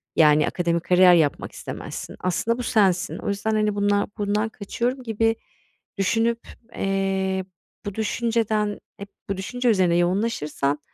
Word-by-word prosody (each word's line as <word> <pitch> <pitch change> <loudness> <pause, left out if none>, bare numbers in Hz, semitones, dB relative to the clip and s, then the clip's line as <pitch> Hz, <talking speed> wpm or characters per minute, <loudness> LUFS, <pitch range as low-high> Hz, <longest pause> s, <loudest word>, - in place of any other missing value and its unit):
Yani 150 -1 +5
akademik 170 -1 -1
kariyer 180 0 +6
yapmak 160 -4 +1
istemezsin. - - -7
Aslında 220 +6 0
bu 250 - -4
sensin. 195 -7 +2
O - - -7
yüzden 200 +2 -1
hani 215 -1 +1
bundan 205 0 +1
bundan 210 +1 0
kaçıyorum 240 +5 -3
gibi 225 0 +1 0.6
düşünüp, 225 +4 +1 0.4
eee, 190 -1 -1 0.4
bu 205 -1 -5
düşünceden 220 -2 0 0.2
hep 200 0 -9 0.2
bu 195 - -1
düşünce 245 +6 -1
üzerine 185 -5 +3
yoğunlaşırsan 175 -6 0
200 Hz, 130 wpm, -24 LUFS, 185-225 Hz, 0.6 s, kariyer